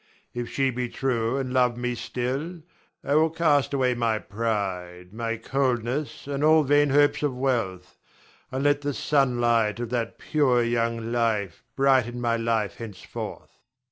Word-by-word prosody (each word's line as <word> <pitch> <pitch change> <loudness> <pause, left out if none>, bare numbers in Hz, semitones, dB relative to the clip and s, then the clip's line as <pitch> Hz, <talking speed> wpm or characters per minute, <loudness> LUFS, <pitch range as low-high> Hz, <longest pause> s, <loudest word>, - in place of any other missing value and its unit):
If 120 -1 -4
she 135 -1 +1
be 125 0 -3
true 120 -1 -1
and 130 -2 -3
love 125 -2 +2
me 125 0 -2
still 135 +8 -4 0.4
I 140 - -1
will 160 +2 +4
cast 155 -4 +2
away 130 -3 +2
my 115 -2 0
pride, 95 -5 -3
my 115 0 -3
coldness, 130 +3 -1
and 140 0 -3
all 155 0 +6
vain 145 +1 +3
hopes 145 +1 +3
of 140 -4 -1
wealth, 115 -9 -2 0.5
and 130 +1 -2
let 145 0 +3
the 145 -1 -2
sunlight 120 -6 +2
of 120 -1 -4
that 115 -2 -2
pure, 130 -6 +2
young 115 -1 -1
life 110 -7 -1
brighten 130 -3 +2
my 120 -1 +1
life 115 -4 -1
henceforth. 105 -5 -8
120 Hz, 150 wpm, -25 LUFS, 115-140 Hz, 0.5 s, all